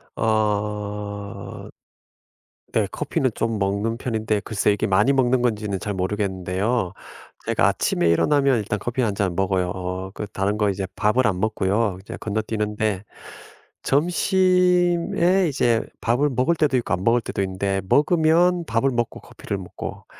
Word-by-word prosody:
어. 105 Hz, -1 st, -2 dB, 1.0 s
네 -, -, +2 dB
커피는 130 Hz, -2 st, -1 dB
좀 115 Hz, -2 st, -1 dB
먹는 100 Hz, +3 st, -1 dB
편인데 110 Hz, -4 st, -1 dB
글쎄 105 Hz, +1 st, +1 dB
이게 100 Hz, -, -1 dB
많이 105 Hz, +8 st, +3 dB
먹는 130 Hz, -1 st, +2 dB
건지는 105 Hz, -5 st, -1 dB
잘 105 Hz, -, -3 dB
모르겠는데요. 95 Hz, +1 st, -1 dB, 0.5 s
제가 -, -, +2 dB
아침에 85 Hz, -, +1 dB
일어나면 140 Hz, -, +3 dB
일단 105 Hz, -1 st, -2 dB
커피 120 Hz, +5 st, -2 dB
1 110 Hz, -4 st, +1 dB
잔 95 Hz, -3 st, -1 dB
먹어요. 95 Hz, -1 st, 0 dB
어 95 Hz, +1 st, -5 dB
그 105 Hz, -, -5 dB
다른 100 Hz, +2 st, -1 dB
거 105 Hz, -1 st, +2 dB
이제 95 Hz, 0 st, -2 dB
밥을 115 Hz, +4 st, +2 dB
안 95 Hz, -4 st, -1 dB
먹고요. 105 Hz, -1 st, 0 dB
이제 95 Hz, -, -8 dB
건너뛰는데 105 Hz, -1 st, -2 dB, 0.8 s
점심에 180 Hz, +2 st, +2 dB
이제 120 Hz, -5 st, +2 dB, 0.2 s
밥을 125 Hz, +6 st, +2 dB
먹을 130 Hz, +7 st, +1 dB
때도 150 Hz, -4 st, +1 dB
있고 120 Hz, -, -1 dB
안 90 Hz, +1 st, -1 dB
먹을 115 Hz, +3 st, +3 dB
때도 100 Hz, -, -4 dB
있는데 95 Hz, +1 st, -1 dB
먹으면 170 Hz, +3 st, +3 dB
밥을 115 Hz, +2 st, +1 dB
먹고 120 Hz, -2 st, -2 dB
커피를 100 Hz, -, -6 dB
먹고 95 Hz, -2 st, -8 dB
110 Hz, 295 characters per minute, -23 LUFS, 100-130 Hz, 1.0 s, 많이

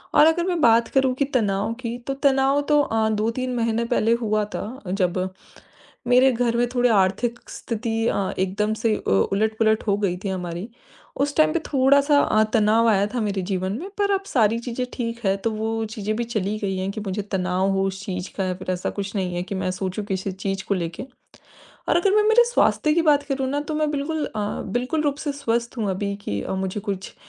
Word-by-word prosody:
और -, -, +8 dB
अगर 340 Hz, +2 st, +2 dB
मैं 360 Hz, -2 st, 0 dB
बात 230 Hz, -1 st, +5 dB
करूँ 265 Hz, -1 st, +2 dB
कि 280 Hz, -, +1 dB
तनाव 205 Hz, -1 st, +1 dB
की 235 Hz, 0 st, -4 dB
तो 275 Hz, -, 0 dB
तनाव 275 Hz, +1 st, +2 dB
तो 295 Hz, -1 st, +5 dB
अ, 220 Hz, -4 st, +1 dB
2-3 230 Hz, +4 st, -1 dB
महीने 230 Hz, 0 st, 0 dB
पहले 230 Hz, -1 st, +2 dB
हुआ 215 Hz, -2 st, +1 dB
था 245 Hz, +5 st, -6 dB
जब, 185 Hz, -2 st, 0 dB, 0.9 s
मेरे 255 Hz, +2 st, +5 dB
घर 235 Hz, 0 st, 0 dB
में 240 Hz, 0 st, +2 dB
थोड़े 245 Hz, 0 st, +3 dB
आर्थिक 225 Hz, +4 st, +1 dB
स्थिति 225 Hz, 0 st, -2 dB
अ, 195 Hz, -4 st, 0 dB
एकदम 205 Hz, +3 st, 0 dB
से 225 Hz, -2 st, +3 dB
अ, -, -, -5 dB
उलट-पुलट 220 Hz, -, +2 dB
हो 200 Hz, 0 st, +2 dB
गई 185 Hz, -4 st, -1 dB
थी 195 Hz, -, 0 dB
हमारी। 180 Hz, +2 st, -4 dB, 0.5 s
उस 285 Hz, 0 st, 0 dB
टाइम 310 Hz, -, +5 dB
पे 340 Hz, -, +1 dB
थोड़ा-सा 280 Hz, +1 st, +4 dB
अ, 215 Hz, -5 st, +3 dB
तनाव 225 Hz, +1 st, +4 dB
आया 200 Hz, -2 st, +3 dB
था 250 Hz, -, -1 dB
मेरे 200 Hz, -3 st, -1 dB
जीवन 185 Hz, 0 st, -1 dB
में 375 Hz, -, -7 dB
पर 405 Hz, 0 st, +2 dB
अब 390 Hz, 0 st, +1 dB
सारी 225 Hz, -, +2 dB
चीज़ें 245 Hz, +1 st, -3 dB
ठीक 230 Hz, -1 st, -3 dB
है। 195 Hz, 0 st, +3 dB
तो 225 Hz, +3 st, -2 dB
वो 220 Hz, +1 st, -2 dB
चीज़ें 215 Hz, 0 st, -3 dB
भी 240 Hz, -, 0 dB
चली 215 Hz, -3 st, -2 dB
गई 195 Hz, -2 st, -2 dB
हैं 185 Hz, +1 st, -2 dB
कि 215 Hz, -, -6 dB
मुझे 195 Hz, +2 st, -2 dB
तनाव 185 Hz, 0 st, +1 dB
हो 195 Hz, 0 st, +1 dB
इस 195 Hz, 0 st, -8 dB
चीज़ 180 Hz, -1 st, -4 dB
का 195 Hz, -, 0 dB
या 185 Hz, -, -1 dB
फिर 185 Hz, 0 st, -4 dB
ऐसा 180 Hz, 0 st, -2 dB
कुछ 200 Hz, +1 st, -4 dB
नहीं 185 Hz, -3 st, -1 dB
है 175 Hz, -, -2 dB
कि 195 Hz, -, -5 dB
मैं 185 Hz, -, -1 dB
सोचूँ 190 Hz, +2 st, -3 dB
किसी 190 Hz, 0 st, -3 dB
चीज़ 195 Hz, +1 st, -3 dB
को 200 Hz, -, +2 dB
लेके। 170 Hz, +5 st, -4 dB, 0.9 s
और -, -, +4 dB
अगर 385 Hz, +3 st, +3 dB
मैं 425 Hz, -, +5 dB
मेरे 475 Hz, +2 st, +6 dB
स्वास्थ्य 305 Hz, -9 st, +3 dB
की 335 Hz, -, +3 dB
बात 285 Hz, -1 st, +3 dB
करूँ 265 Hz, -1 st, -1 dB
ना 290 Hz, +1 st, 0 dB
तो 300 Hz, +1 st, -4 dB
मैं 305 Hz, 0 st, 0 dB
बिल्कुल 295 Hz, +1 st, -2 dB
अ, 210 Hz, -2 st, -3 dB
बिल्कुल 250 Hz, +9 st, -1 dB
रूप 285 Hz, -2 st, 0 dB
से 290 Hz, -, 0 dB
स्वस्थ 235 Hz, -3 st, -2 dB
हूँ 210 Hz, -3 st, 0 dB
अभी 200 Hz, +2 st, -2 dB
की 100 Hz, 0 st, -2 dB
अ, -, -, -4 dB
मुझे 190 Hz, +2 st, -3 dB
कुछ 195 Hz, -1 st, -5 dB
220 Hz, 220 wpm, -23 LUFS, 195-260 Hz, 0.9 s, और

